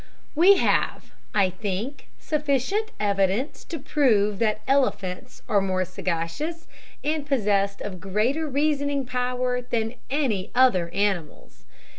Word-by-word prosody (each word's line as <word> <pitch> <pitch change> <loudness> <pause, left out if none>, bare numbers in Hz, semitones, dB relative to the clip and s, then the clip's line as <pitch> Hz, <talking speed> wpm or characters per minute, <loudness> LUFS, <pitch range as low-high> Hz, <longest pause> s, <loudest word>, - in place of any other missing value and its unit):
We 370 +6 +6
have, - - 0 0.2
I 195 -3 +3
think, 205 +8 -4
sufficient 300 - 0
evidence 200 +5 0
to 335 - -5
prove 215 -9 +2
that 215 -2 +1
elephants 255 -9 0
are 200 - +3
more 185 -1 0
sagacious, 185 - -3 0.4
and 305 0 0
possessed 205 -8 +1
of 185 -4 -6
greater 220 +12 0
reasoning 285 -1 0
power, 250 0 -1
than 230 -2 -2 0.2
any 255 -9 0
other 220 -10 +4
animals. 175 - -3
235 Hz, 115 wpm, -25 LUFS, 195-280 Hz, 0.4 s, We